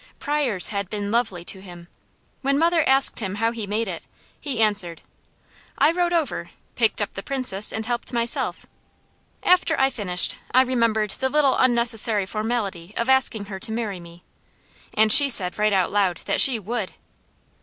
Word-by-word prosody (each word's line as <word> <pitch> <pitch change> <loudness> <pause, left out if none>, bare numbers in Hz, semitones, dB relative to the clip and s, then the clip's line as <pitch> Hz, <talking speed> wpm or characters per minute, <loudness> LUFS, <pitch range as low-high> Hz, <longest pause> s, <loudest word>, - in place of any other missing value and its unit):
Pryors 285 -10 +1
had 200 -3 -5
been 205 -1 -5
lovely 215 -7 -2
to 190 - -5
him. 175 -2 -14 0.5
When 275 +1 -1
mother 335 +1 +1
asked 270 0 +5
him 195 -3 -5
how 225 +2 -1
he 225 -3 -7
made 215 +3 -3
it, 175 -3 -6 0.4
he 275 -6 -6
answered: 205 -6 -1 0.7
"I - - +3
rode 350 0 -2
over, 330 -4 -3 0.2
picked - - -1
up - - -8
the - - -7
Princess 250 -7 +2
and 220 0 -6
helped 240 0 -4
myself. 235 -1 -1 0.8
After 360 -3 +2
I 270 0 +1
finished, 180 -7 -2 0.2
I 260 - +5
remembered 230 -5 -1
the 265 +5 -3
little 290 -1 +1
unnecessary 230 -4 +3
formality 215 -4 -5
of 235 +2 -3
asking 250 -5 +2
her 195 -1 -9
to 225 +3 -4
marry 220 -4 -5
me; 170 0 -16 0.7
and 215 0 +4
she 285 -1 +8
said 185 -6 +5
right 210 0 +1
out 190 -2 0
loud 195 -5 -1
that - - +1
she 260 -4 +6
WOULD. 215 -1 -6
220 Hz, 170 wpm, -21 LUFS, 200-260 Hz, 0.8 s, she